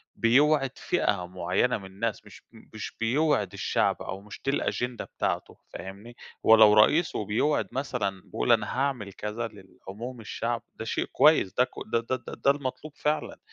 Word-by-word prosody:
بيوعد 135 +3 +3
فئة 100 - 0
معينة 90 +7 0
من 100 - -11
الناس، 105 +3 -4
مش 105 - -14 0.3
مش 110 - -7
بيوعِد 145 +7 +1
الشعب - - 0
أو 95 +1 -6
مش 105 0 -11
دي 135 - +2
الأجندة 125 -3 -2
بتاعته، - - -3 0.2
فاهمني؟ 100 +5 -9 0.3
ولو 110 -1 +8
رئيس 150 +11 +4
وبيوعِد 110 +2 0
مثلًا، 100 -8 -2
بيقول - - -1
أنا 110 +1 +2
هاعمل 125 -8 -1
كذا 105 +3 -4
للعموم 110 +4 -10
الشعب، 115 +2 -3
ده 110 - -6
شيء - - -1
كويّس، 150 -11 +4
ده 125 - +4
ك - - -6 0.2
ده 115 - +4
ده 130 -2 -1
ده 140 - +3
المطلوب 140 +1 -5
فعلًا، 150 +1 -1
إن - - -19
115 Hz, 160 wpm, -27 LUFS, 105-135 Hz, 0.3 s, ولو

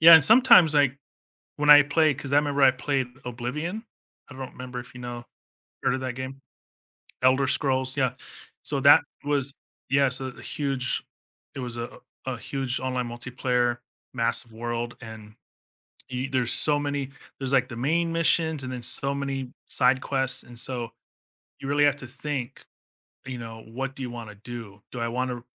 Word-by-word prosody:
Yeah, 165 +1 +10
and 160 - +9
sometimes, 210 - +7
like, 140 -2 +3 0.6
when 150 0 +3
I 145 0 +10
play 150 +1 +2
'cause 135 +1 -7
I - - +5
remember 145 -1 +2
I 135 - +8
played 135 0 -1 0.2
Oblivion. 150 - -4 0.5
I - - -10
don't 130 -1 -7
remember 125 -1 -7
if, 125 - -14
you 125 - -10
know 120 -1 -6 0.6
heard - - +2
of 130 - -2
that 130 -1 -4
game? 130 +1 -7 0.8
Elder 130 +1 +4
Scrolls, 130 -1 +1
yeah. 130 -2 +1 0.5
So 140 - -1
that 145 +1 +8 0.2
was 140 -2 +1 0.4
yeah, 135 +1 +4
so 130 +1 -3
a 125 - -10
huge 135 -3 -2 0.5
it - - -7
was 125 -2 -4
a 120 0 -6 0.3
a 130 -2 -3
huge 130 +1 -3
online 125 -2 -2
multiplayer 120 0 -1 0.3
massive 115 -1 +1
world, 120 +1 -4
and 110 -2 -11 0.8
y 125 +2 -3
there's 125 -3 +1
so 150 -1 +6
many 145 -2 -2 0.3
there's, 135 0 -1
like, 130 -2 +3
the 120 - -7
main 165 +8 0
missions 160 -2 +1
and 130 - -5
then 125 -1 -5
so 140 +3 +2
many 135 -2 -4 0.2
side 130 0 +4
quests, 135 -2 -1
and 120 -1 -9
so, 120 -2 -3 0.7
you 135 - -7
really 145 +1 +4
have 145 -1 +3
to 130 - -9
think, 135 -1 -5 0.6
you 130 -1 -5
know, 115 -1 -9
what 135 +4 -5
do 135 - -6
you 125 - -4
wanna 115 -3 -8
do? 110 -2 -9
Do 125 - -6
I 115 - -1
wanna 125 0 -3
130 Hz, 175 wpm, -26 LUFS, 120-140 Hz, 0.8 s, Yeah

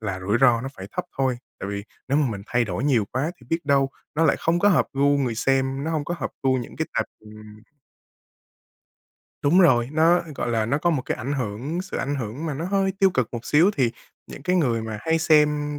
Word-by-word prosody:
là 95 -4 -4
rủi 100 +5 0
ro 120 -3 +5
nó 135 - -4
phải 95 - -8
thấp 180 - -3
thôi, 130 -2 +1 0.2
tại 95 - -4
vì 100 0 -4 0.2
nếu 140 - +2
mà 140 -5 +1
mình 100 -3 -6
thay 125 0 +1
đổi 105 +5 -3
nhiều 125 -7 +3
quá 135 +6 -1
thì 125 - -20
biết 165 - +2
đâu 140 -1 +3 0.3
nó 165 +2 +2
lại 145 - +4
không 170 +1 +1
có 205 - +4
hợp 195 - +3
gu 140 +1 +2
người 125 -5 0
xem, 135 +3 0
nó 160 - -2
hông 155 -3 -1
có 175 - -3
hợp - - -3
gu 130 -1 +3
những 120 - -8
cái - - -1
tệp - - +1 0.2
ừm. 110 0 -13 2.0
Đúng 170 +7 +4
rồi, 120 -8 +4
nó, 165 +3 +4
gọi 120 - -3
là, 110 -2 +1
nó 140 +5 +1
có 175 +3 +1
một 145 -6 0
cái 145 - -3
ảnh 130 +5 -4
hưởng, 135 - -3
sự 190 - -6
ảnh 140 +1 -2
hưởng 130 +4 -4
mà 150 - -2
nó 155 +5 -4
hơi 195 +1 +1
tiêu 195 -2 +5
cực 130 -10 0
một 120 0 -5
xíu 170 +7 +4
thì 130 -5 +2 0.4
những - - -10
cái 180 0 +1
người 120 -9 +1
mà 110 -1 -5
hay 160 +7 +1
xem 150 -2 +2
135 Hz, 245 wpm, -24 LUFS, 115-160 Hz, 2.0 s, ro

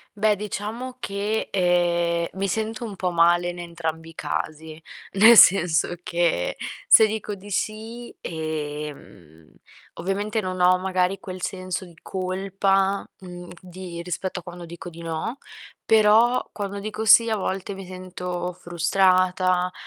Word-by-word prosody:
Beh, 210 0 +3
diciamo 215 +5 -5
che, 205 +1 -2
ehm, 175 -2 +1
mi 195 - 0
sento 220 +4 -3
un 210 -3 -7
po' 180 -1 -2
male 175 +1 +3
in 175 0 -7
entrambi 165 -1 -5
i 165 - -15
casi, 155 0 -5 0.3
nel 220 +4 +8
senso 175 -3 +6
che 170 - 0 0.3
se 220 - +8
dico 215 -1 -3
di 200 +1 -12
sì, 220 +4 -4
ehm, 150 - -6 0.4
ovviamente, 205 +5 -2
non 185 -2 -4
ho 180 +1 +5
magari 185 0 0
quel 185 -1 -8
senso 185 0 -4
di 170 -2 -16
colpa, 195 +1 0
mhmm, 180 -1 -10
di 180 -1 -8
rispetto 180 +2 -4
a - - -13
quando 175 0 -9
dico 170 +1 -9
di 170 0 -12
no, 165 +10 -4 0.5
però 225 +3 +4
quando 200 -1 -5
dico 215 +2 -4
sì 230 +2 +7
a 220 - 0
volte 195 0 -3
mi 195 0 -8
sento 180 -1 -5
frustrata, 180 +1 +2
185 Hz, 140 wpm, -24 LUFS, 175-200 Hz, 0.5 s, nel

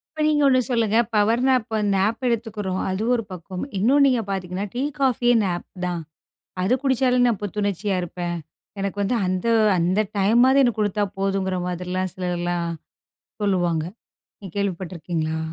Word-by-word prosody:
இப்போ 310 - -1
நீங்க 300 -1 +3
ஒன்னு 255 -1 +4
சொல்லுங்க. 225 -2 +2 0.2
பவர் 215 +3 +3
நேப்ப 245 -4 +1 0.2
நேப்ப 215 +6 0
எடுத்துக்கிறோம் 210 -5 -2
அது 190 +3 -2
ஒரு 230 -2 0
பக்கம். 180 +1 -6
இன்னும் 265 +9 +4
நீங்க 250 -4 +3
பார்த்தீங்கன்னா 190 0 -3
டீ 250 - -2 0.2
காஃபியே 245 -2 +3
நேப் 175 -2 -2 0.2
தான். 175 -2 -2 0.6
"அது 215 +7 +3
குடிச்சாலே 260 -2 +2
நான் 230 -5 0
புத்துணர்ச்சியா 205 -1 -1
இருப்பேன். 175 0 -4 0.4
எனக்கு 200 +1 -3
வந்து 220 +5 +1
அந்த 185 +3 -1 0.3
அந்த 180 +4 +2 0.2
டைமாவது 240 +7 +5
எனக்கு 240 -4 +1
கொடுத்தா 205 0 +1 0.2
போதுங்கிற 195 -1 0
மாதிரிலாம்" 180 +1 -3
சிலர்லாம் 175 -1 -2 0.7
சொல்லுவாங்க 175 -5 +1 0.6
நீங்க 195 -4 -9
கேள்விப்பட்டுருக்கீங்களா? 170 -4 -2
200 Hz, 140 wpm, -23 LUFS, 180-230 Hz, 0.7 s, டைமாவது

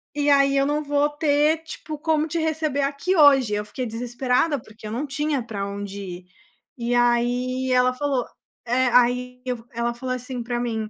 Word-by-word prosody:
E 290 0 +1
aí 275 -1 +4
eu 275 - +3
não 295 +1 0
vou 290 0 +2
ter, 295 +1 +2
tipo, 310 -1 -7
como 315 0 +1
te 330 +2 -2
receber 315 -3 0
aqui 280 +7 0
hoje.” 275 - +6
Eu 210 0 -1
fiquei 245 +5 -5
desesperada, 250 +5 0
porque 215 -1 -12
eu - - -6
não 260 +6 -2
tinha 285 -1 -1
pra 205 -4 -4
onde 200 0 -6
ir. 180 -2 -8 0.5
E 240 +1 -1
aí 245 +2 +1
ela 250 0 +4
falou 270 -2 -1 0.4
É, 250 +2 +2
aí 250 +1 +2
eu 245 -2 -4
ela 235 0 -1
falou 255 +1 -4
assim 250 0 -5
pra 240 0 -2
mim: 225 -3 -2
255 Hz, 185 wpm, -23 LUFS, 240-290 Hz, 0.5 s, hoje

